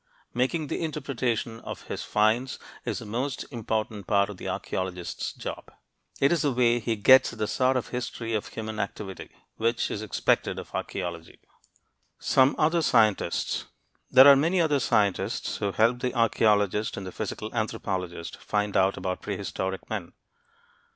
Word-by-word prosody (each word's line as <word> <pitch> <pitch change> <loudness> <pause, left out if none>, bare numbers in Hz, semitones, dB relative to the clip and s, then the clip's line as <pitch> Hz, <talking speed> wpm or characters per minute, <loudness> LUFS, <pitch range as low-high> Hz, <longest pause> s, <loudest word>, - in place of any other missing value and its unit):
Making 130 +6 0
the 145 - -3
interpretation 130 -7 -2
of - - -8
his - - -5
finds 110 +5 +1 0.3
is - - -2
the - - -7
most 125 +6 -3
important 110 -4 -3
part 100 -1 +2
of 100 - -10
the - - -7
archeologist's 90 -2 -3
job. - - -7 0.5
It 140 - +4
is 170 - +2
the 145 - +2
way 120 -1 +3
he 115 0 -1
gets 130 +6 +6
at - - -10
the 110 - 0
"sort 130 +4 +2
of 125 - -3
history 120 -2 -4
of 105 - -1
human 110 -1 -6
activity" 100 -1 -5 0.3
which 115 +1 0
is 105 - -3
expected 110 - 0
of - - -8
archeology. 85 -3 -5 0.8
SOME 130 0 +3
OTHER 160 +2 +3
SCIENTISTS 110 -8 +2 0.4
There 130 +2 +9
are 140 - +10
many 165 +7 +2
other 150 -4 +3
scientists 105 -3 0
who 100 -2 -1
help 115 +4 +2
the 125 0 -2
archeologist 105 -2 +2
and 95 - -5
the 95 - -6
physical - - -5
anthropologist 90 -3 -3
find 105 -1 -2
out 95 0 +3
about 90 -1 -3
prehistoric 95 0 -4
men. - - -5
110 Hz, 155 wpm, -27 LUFS, 100-130 Hz, 0.8 s, are